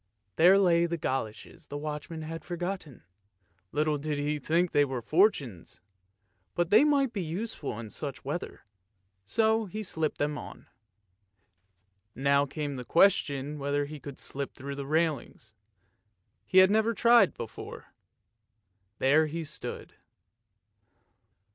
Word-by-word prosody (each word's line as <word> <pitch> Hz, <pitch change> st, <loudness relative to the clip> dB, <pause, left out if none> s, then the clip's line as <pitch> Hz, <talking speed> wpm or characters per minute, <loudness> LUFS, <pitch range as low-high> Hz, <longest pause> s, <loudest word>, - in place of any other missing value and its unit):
There 180 Hz, +4 st, +6 dB
lay 170 Hz, -3 st, +4 dB
the 170 Hz, 0 st, -2 dB
goloshes 120 Hz, -8 st, -4 dB
the 145 Hz, -, -5 dB
watchman 150 Hz, +2 st, -5 dB
had 165 Hz, +1 st, -6 dB
forgotten; 175 Hz, -, -5 dB, 0.7 s
little 150 Hz, 0 st, 0 dB
did 150 Hz, 0 st, -2 dB
he 150 Hz, +1 st, -1 dB
think 170 Hz, +5 st, +1 dB
that -, -, +2 dB
they -, -, +7 dB
were 135 Hz, -3 st, -2 dB
Fortune's, 135 Hz, -, +1 dB, 0.8 s
but 175 Hz, -1 st, 0 dB
they 215 Hz, +6 st, +7 dB
might 280 Hz, -4 st, +2 dB
be 200 Hz, -, -2 dB
useful 165 Hz, -, -4 dB
in 110 Hz, -2 st, -8 dB
such 140 Hz, -4 st, -5 dB
weather; 150 Hz, +6 st, -5 dB, 0.6 s
so 220 Hz, -, +2 dB
he 215 Hz, +3 st, -5 dB
slipped 160 Hz, -5 st, -1 dB
them 145 Hz, 0 st, -1 dB
on. -, -, -10 dB, 1.5 s
Now 140 Hz, +2 st, +2 dB
came 145 Hz, 0 st, -4 dB
the 125 Hz, -, -5 dB
question 145 Hz, -2 st, +2 dB
whether 145 Hz, +1 st, 0 dB
he 150 Hz, +1 st, -8 dB
could 140 Hz, -1 st, -9 dB
slip 140 Hz, 0 st, -5 dB
through 140 Hz, +2 st, -6 dB
the 140 Hz, 0 st, -6 dB
railings; 150 Hz, -8 st, -1 dB, 0.9 s
he 190 Hz, -, +1 dB
had 185 Hz, +1 st, +8 dB
never 220 Hz, +2 st, +2 dB
tried 235 Hz, -4 st, +6 dB
it -, -, -25 dB
before. 115 Hz, -2 st, -8 dB, 1.0 s
There 150 Hz, +4 st, +4 dB
he 165 Hz, +2 st, -4 dB
stood. 150 Hz, -, -6 dB
155 Hz, 135 wpm, -29 LUFS, 140-180 Hz, 1.5 s, had